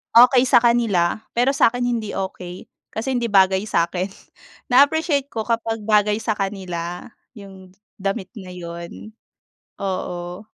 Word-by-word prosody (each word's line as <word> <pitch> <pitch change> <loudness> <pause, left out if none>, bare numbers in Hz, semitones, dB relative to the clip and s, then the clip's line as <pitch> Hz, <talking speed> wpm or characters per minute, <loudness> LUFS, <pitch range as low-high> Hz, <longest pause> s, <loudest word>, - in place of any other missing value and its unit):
okey 250 +1 +7
sa 240 - +6
kanila 225 -7 +2 0.2
pero 245 +3 +3
sa 275 - +4
akin 245 - -3
hindi 235 -4 -2
okey 185 -2 -6 0.3
kasi 235 +5 -2
hindi 240 - -1
bagay 190 -1 +3
sa 170 - +2
akin. 180 +1 -2 0.7
Na-appreciate 285 +2 +4
ko 225 - -4
kapag 225 -1 -2
bagay 210 -1 +3
sa 220 - 0
kanila 180 -3 -4 0.3
yung 190 -3 -13 0.3
damit 195 -1 -2
na 190 - -10
yun, 170 +4 -8 0.7
oo. 180 0 -4
205 Hz, 135 wpm, -21 LUFS, 185-235 Hz, 0.7 s, okey